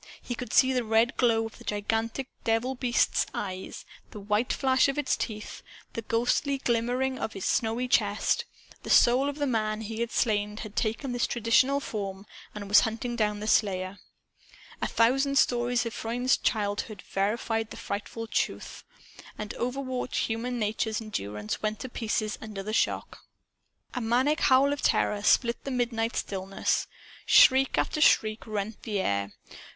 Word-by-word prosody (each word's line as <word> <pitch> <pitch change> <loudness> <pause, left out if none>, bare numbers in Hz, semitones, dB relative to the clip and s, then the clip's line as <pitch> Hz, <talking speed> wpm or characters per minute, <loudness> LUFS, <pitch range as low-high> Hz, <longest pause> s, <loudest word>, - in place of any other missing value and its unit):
He 245 - -5
could 245 +1 -6
see 260 0 +5
the 250 -1 +1
red 225 +2 +2
glow 230 -2 +2
of 225 - -9
the - - -12
gigantic 225 +5 -2 0.2
devil 225 +3 +1
beast's 245 -2 +1
eyes, 185 -2 -5 0.2
the 210 - -9
white 210 +4 0
flash 260 -1 +3
of 275 - -2
its 290 -3 +1
teeth, 210 -1 -5 0.3
the 230 - -3
ghostly 245 +5 0
shimmering 250 +3 0
of 220 - -4
its 195 - -5
snowy 230 +2 0
chest. 210 -4 +1 0.4
The - - -9
soul 255 +4 +5
of 285 - -5
the 290 - 0
man 215 -4 -1
he 220 +1 -5
had 235 0 -1
slain 210 -1 0
had 215 -2 -8
taken 230 +4 -1
this 245 -1 0
traditional 245 +4 +3
form 200 -6 -5 0.3
and 205 -1 -6
was 205 +1 +7
hunting 230 +3 -2
down 210 -2 0
the 215 - -4
slayer! 190 -3 +1 0.8
A - - +1
thousand 270 +4 +2
stories 245 -1 +2
of 230 - -4
Freund's 245 +3 0
childhood 205 -1 -2
verified 225 +2 -1
the - - -9
frightful 210 +3 -5
truth. 220 - -3 0.5
And 210 0 -5
overwrought 255 0 -3
human 235 +2 -3
nature's 220 0 -1
endurance 105 - -4
went 215 0 -1
to 260 - -5
pieces 215 -2 -2
under 210 -3 -6
the 215 +2 -4
shock. - - -1 0.7
A 250 - -3
maniac 255 +7 +2
howl 270 +1 +4
of 285 - -5
terror 205 -1 +1
split 235 +3 +2
the - - -4
midnight 240 -2 -1
stillness. 195 0 -1 0.4
Shriek 265 +1 +6
after 305 - 0
shriek 215 -7 +3
rent 210 0 -4
the 210 -4 -2
air. 100 - -1
225 Hz, 160 wpm, -28 LUFS, 210-250 Hz, 0.8 s, was